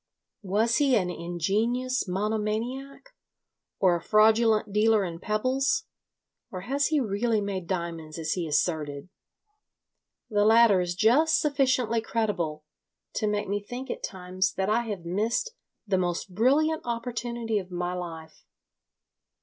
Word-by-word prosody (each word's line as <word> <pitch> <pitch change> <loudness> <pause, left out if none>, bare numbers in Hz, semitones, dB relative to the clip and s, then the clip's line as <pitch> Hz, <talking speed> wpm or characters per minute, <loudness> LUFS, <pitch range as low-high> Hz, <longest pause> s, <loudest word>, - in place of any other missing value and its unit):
Was 215 +4 +1
he 280 -4 +3
an 180 -5 +1
ingenious 210 +10 -1
monomaniac, 220 - -3 0.7
or 185 -3 +3
a 170 - -3
fraudulent 215 0 +3
dealer 215 -1 +3
in 170 -2 -6
pebbles, 260 - 0 0.7
or 185 - -6
has 275 +8 0
he 310 -2 +1
really 225 -1 0
made 195 -4 -4
diamonds 170 -4 -4
as 160 -2 -3
he 175 -3 -3
asserted? 150 0 -1 1.2
The 205 -3 +1
latter 220 -3 +6
is 175 0 -2
just 265 - +4
sufficiently 260 -6 +1
credible 190 -10 -2 0.5
to 215 - -1
make 210 0 -1
me 205 +1 -1
think 245 +5 -6
at - - -5
times 185 0 -2
that 190 +1 -1
I 235 +2 +1
have 200 -6 -5
missed 215 - -1 0.3
the 195 -3 +1
most 175 +1 -2
brilliant 295 - +2
opportunity 235 -2 -2
of 185 -2 -9
my 180 0 -3
life. 165 -3 -8
210 Hz, 135 wpm, -27 LUFS, 180-235 Hz, 1.2 s, latter